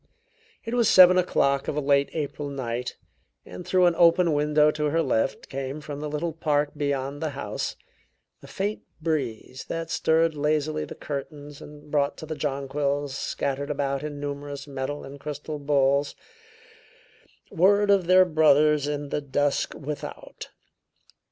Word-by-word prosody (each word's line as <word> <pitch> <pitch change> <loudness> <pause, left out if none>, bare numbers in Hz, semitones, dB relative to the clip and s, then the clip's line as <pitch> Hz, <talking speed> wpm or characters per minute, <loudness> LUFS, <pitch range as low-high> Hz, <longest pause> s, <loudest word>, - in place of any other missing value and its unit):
It 230 - -4
was 240 -3 +3
seven 185 0 +8
o'clock 140 -6 +1
of - - -2
a - - 0
late 140 -1 +2
April 145 -1 -4
night, 125 -3 -4 0.5
and - - -9
through 180 +1 +3
an 175 - +4
open 170 0 +4
window 150 +1 +3
to 150 0 -2
her 165 +3 +1
left 115 -5 -1
came, 135 +2 -5
from 150 -2 -7
the 150 0 -4
little 155 +3 -3
park 150 -2 0
beyond 140 -1 -2
the 160 - -1
house, 105 -6 -4 0.7
a - - -13
faint 205 +2 -3 0.2
breeze 135 -6 -3
that 165 0 -4
stirred 160 0 +2
lazily 155 +1 -1
the - - -9
curtains 145 0 -7
and 150 0 -13
brought 145 -1 +1
to - - -8
the 155 - -4
jonquils, 140 -1 -2
scattered 140 +1 -3
about 140 -2 -1
in 150 -1 -6
numerous 145 -1 -5
metal 140 +1 -5
and 140 +1 -10
crystal 150 +1 -6
bowls, 140 0 +1 1.4
word 200 +3 +4
of 190 -4 +3
their 185 +1 +7
brothers 150 -3 +4
in 145 -1 -3
the 150 - -2
dusk 145 0 -1
without. 145 +1 -7
145 Hz, 150 wpm, -25 LUFS, 140-155 Hz, 1.4 s, seven